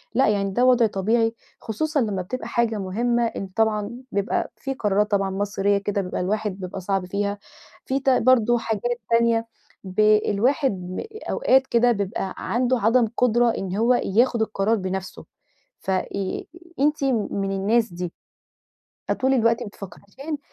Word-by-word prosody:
لأ، 265 - +4
يعني 200 -2 0
ده 245 +6 +2
وضع 250 -2 +5
طبيعي، 225 +3 +1 0.3
خصوصًا 295 +6 -1
لمّا 205 -4 -1
بتبقى 255 +8 -5
حاجة 230 -2 0
مهمَّة، 235 +5 0
إن 220 -3 -4
طبعًا 215 -1 +1 0.2
بيبقى 200 0 -1
في 270 0 -4
قرارات 210 -3 0
طبعًا 195 -1 +1
مصيرية 200 +1 0
كده، 200 0 -1
بيبقى 180 -1 -4
الواحد 205 +1 -2
بيبقى 185 +1 -6
صعب 195 0 -1
فيها. 200 +2 -2 0.5
في 265 +1 0
ت 270 0 +1
برضه 240 -2 +4
حاجات 235 +1 -2
تانية، 230 0 +2 0.4
ب 190 +1 -6 0.3
الواحد 260 +7 +2
ب 185 -1 -6 0.3
أوقات 265 - +3
كده 240 +1 +3
بيبقى 195 -3 -2
عنده 250 +1 0
عدم 230 +2 +3
قدرة 240 -1 +3
إن 195 -4 -3
هو 235 +3 +4
ياخد 235 +1 +2
القرار 215 0 +1
بنفسه. 190 -2 -5 0.5
فآآ 190 0 -2 0.4
أنتِ 295 +1 +2 0.3
من 195 -1 -2
الناس 215 +2 +1
دي، 175 0 -5 1.0
أ - - +5
طول 265 +1 +1
الوقت 230 -1 +2
بتفكِّر 200 -3 -10
عشان 290 +8 -6
220 Hz, 150 wpm, -23 LUFS, 195-240 Hz, 1.0 s, وضع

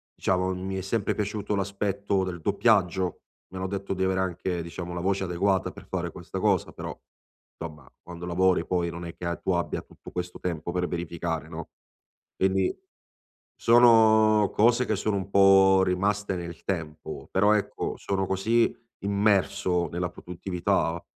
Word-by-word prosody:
Diciamo 95 0 0
mi 95 +1 -4
è 95 - -2
sempre 100 +2 -1
piaciuto 105 0 -2
l'aspetto 100 0 -1
del 90 -2 -5
doppiaggio, 95 -3 +2 0.3
mi 95 - -8
hanno 95 - -2
detto 100 0 -3
di 95 - -1
avere 95 0 +1
anche, 90 -1 -2
diciamo, 85 +1 -6
la 85 - -3
voce 95 +1 0
adeguata 95 +2 0
per - - -13
fare - - -3
questa - - -7
cosa - - +1
però, - - -7 0.6
insomma 75 -5 -8
quando 85 0 -9
lavori, 90 0 +2
poi 90 -2 0
non 85 +1 -7
è 85 - -7
che 85 0 -4
tu - - +1
abbia 85 -1 -1
tutto - - -14
questo 90 0 -5
tempo 85 -1 -3
per 90 0 -1
verificare 85 -2 -3
no? 80 -1 -7 0.7
Quindi, 95 0 +1 0.8
sono 110 -3 +5
cose 120 +3 +4
che 110 - 0
sono 105 +1 -1
un 95 0 -4
po' 95 -1 +6
rimaste 95 +2 0
nel 85 -1 -7
tempo 80 -5 -5
però 105 +3 +4
ecco, 105 -2 -1
sono 95 -1 -2
così 110 +5 +2 0.3
immerso 100 -3 +1
nella 90 +1 -2
produttività, 90 -2 -2
95 Hz, 155 wpm, -27 LUFS, 85-100 Hz, 0.8 s, po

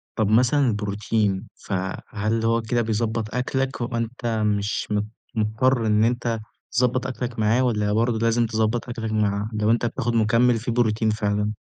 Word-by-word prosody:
طب 110 -2 +1
مثلًا 125 +5 +4
البروتين، 105 0 -1
ف - - -7 0.4
هل 110 +2 -1
هو 115 +1 +2
كده 120 +2 0
بيضبّط 110 0 -2
أكلك، 130 +1 -1
وأنت 120 0 -3 0.2
مش 105 0 0
مض 105 0 +1 0.3
مُضطر 115 +3 +1
إن 105 0 +3
أنت 120 -1 0 0.3
تضبط 125 +1 +1
أكلك 125 -2 -4
معاه، 110 +4 +3
والًا 105 -4 +1
برضه 115 +1 +1
لازم 115 +1 +2
تضبط 110 +2 -1
أكلك 115 -2 -4
معاه 105 -1 0
لو 105 +1 +1
أنت 115 +1 +2
بتاخد 120 0 -1
مكمل 115 +2 +3
فيه 120 +2 -3
بروتين 110 -2 +1
فعلًا؟ 105 -1 0
115 Hz, 160 wpm, -23 LUFS, 105-120 Hz, 0.4 s, مثلًا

